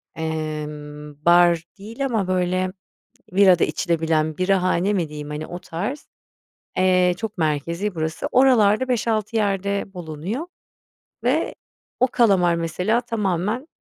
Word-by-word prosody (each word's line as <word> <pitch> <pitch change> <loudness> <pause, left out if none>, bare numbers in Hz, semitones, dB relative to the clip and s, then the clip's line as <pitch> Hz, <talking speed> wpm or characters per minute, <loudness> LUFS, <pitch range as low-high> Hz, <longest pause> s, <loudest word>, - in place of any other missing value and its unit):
emm, 150 -2 -5
bar 175 -1 +5 0.2
değil 225 +7 -5
ama, 220 -7 0
böyle, 185 0 0 0.6
bira 185 -2 +5
da - - +3
içilebilen 160 -3 0
birahane 185 +1 +2
mi 175 -6 -1
diyeyim? 150 -1 -7
Hani, 150 +1 -4
o 175 - -6
tarz. 205 - -5 0.7
Eee, 185 -1 +3
çok 220 0 -6
merkezi 170 +6 -1
burası. 160 -1 -3
Oralarda 250 -2 +4
5-6 225 -2 0
yerde 200 -1 -1
bulunuyor 180 - -5 0.8
ve - - +1 0.4
o 255 - +4
kalamar 195 -9 +3
mesela 180 +8 0
tamamen 215 - -2
185 Hz, 115 wpm, -22 LUFS, 160-210 Hz, 0.8 s, bar